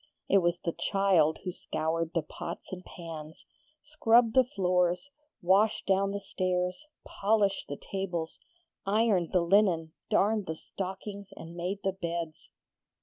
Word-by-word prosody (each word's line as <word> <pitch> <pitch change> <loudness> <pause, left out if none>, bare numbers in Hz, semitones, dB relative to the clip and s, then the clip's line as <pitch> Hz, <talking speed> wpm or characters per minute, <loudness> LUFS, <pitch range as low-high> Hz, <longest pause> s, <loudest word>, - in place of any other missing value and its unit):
It 195 - +5
was 175 -1 +1
the 170 - -2
child 185 -5 +2
who 185 - -2
scoured 165 0 -2
the 165 - +2
pots 155 - -7
and 180 0 -6
pans, 160 -4 -9 0.4
scrubbed 240 -6 +4
the 260 - +6
floors, 180 +1 0 0.3
washed 195 +5 +3
down 195 0 +2
the 200 0 -3
stairs, 185 +7 -2 0.2
polished 200 -1 +1
the 145 - -5
tables, 180 -4 -4 0.4
ironed 200 -4 +2
the 180 - +3
linen, 170 -3 +3 0.2
darned 210 0 +2
the 160 - -2
stockings, 195 +3 -6
and 165 +1 -9
made 180 +3 -3
the 195 - +1
beds. 170 -3 -5
185 Hz, 140 wpm, -30 LUFS, 170-200 Hz, 0.4 s, the